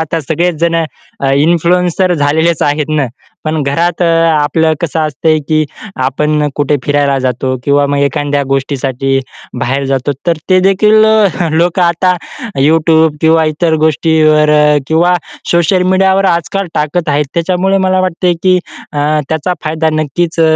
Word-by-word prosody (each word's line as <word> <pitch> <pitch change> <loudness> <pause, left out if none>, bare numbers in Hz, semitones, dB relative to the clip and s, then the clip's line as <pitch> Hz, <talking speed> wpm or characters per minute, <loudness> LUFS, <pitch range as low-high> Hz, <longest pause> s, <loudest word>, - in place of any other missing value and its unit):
आता 160 +1 -2
सगळेच 165 +4 -1
जण 170 0 +1 0.5
अ, 135 -1 0
इन्फ्लुएन्सर 175 +4 +1
झालेलेच 160 +2 +1
आहेत 145 0 0
ना 150 -3 0 0.4
पण 155 -1 -1
घरात 165 +6 -1
अ, - - +3 0.3
आपलं 160 +1 +1
कसं 165 -1 -2
असतंय 155 +1 0
की 155 -1 +2 0.4
आपण 150 +3 0
कुठे 145 0 0
फिरायला 145 -1 +1
जातो 130 +1 -2
किंवा 145 0 +2
मग 140 0 -1
एखाद्या 145 0 0
गोष्टीसाठी 135 -1 -1 0.4
बाहेर 135 +3 -1
जातो 135 +1 0
तर 170 - +2
ते 185 - +5
देखील 210 +3 +3 0.5
लोकं 175 +2 +1
आता 175 +1 +2 0.5
YouTube 160 +1 +3
किंवा 160 0 +3
इतर 160 +2 0
गोष्टीवर 155 -1 +2 0.4
किंवा 170 +4 +2 0.4
सोशल 175 +2 +2
मीडियावर 190 +1 +2
आजकाल 185 +2 -1
टाकत 155 +3 -1
आहेत 150 0 +1
त्याच्यामुळे 185 +3 0
मला 185 0 +1
वाटते 180 -1 0
की 185 -1 +3 0.4
अ, 145 - -4 0.3
त्याचा 160 +3 -1
फायदा 160 +1 -1
नक्कीच 155 +2 -2
160 Hz, 140 wpm, -12 LUFS, 145-175 Hz, 0.5 s, ते